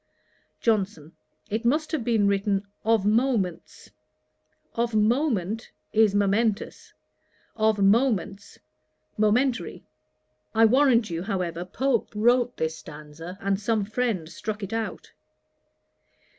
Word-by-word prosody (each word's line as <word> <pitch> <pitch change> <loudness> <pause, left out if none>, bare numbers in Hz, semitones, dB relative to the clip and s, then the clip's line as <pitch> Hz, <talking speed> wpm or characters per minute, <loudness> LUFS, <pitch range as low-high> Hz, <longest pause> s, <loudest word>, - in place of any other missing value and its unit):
JOHNSON. 195 -8 0 0.4
'It 220 +3 -1
must 300 +6 +1
have 310 -7 -1
been 225 -4 +2
written 200 0 0 0.2
"of 220 -2 +2
moments." 215 -5 -1 0.8
Of 235 -1 -1
moment, 225 - +1 0.2
is 215 -2 +4
momentous; 205 +2 0 0.6
of 220 -1 +2
moments, 200 -1 +1 0.6
momentary. 215 -1 +1 0.7
I 225 +1 +6
warrant 240 -3 +4
you, 165 0 -3
however, 180 -3 -3
Pope 250 +5 -1
wrote 245 +3 +2
this 160 0 -2
stanza, 155 +4 -10
and 195 0 0
some 215 -1 0
friend 220 -6 -2
struck 210 +5 -6
it 195 +3 -5
out. 225 -1 -4
215 Hz, 105 wpm, -25 LUFS, 195-235 Hz, 0.8 s, I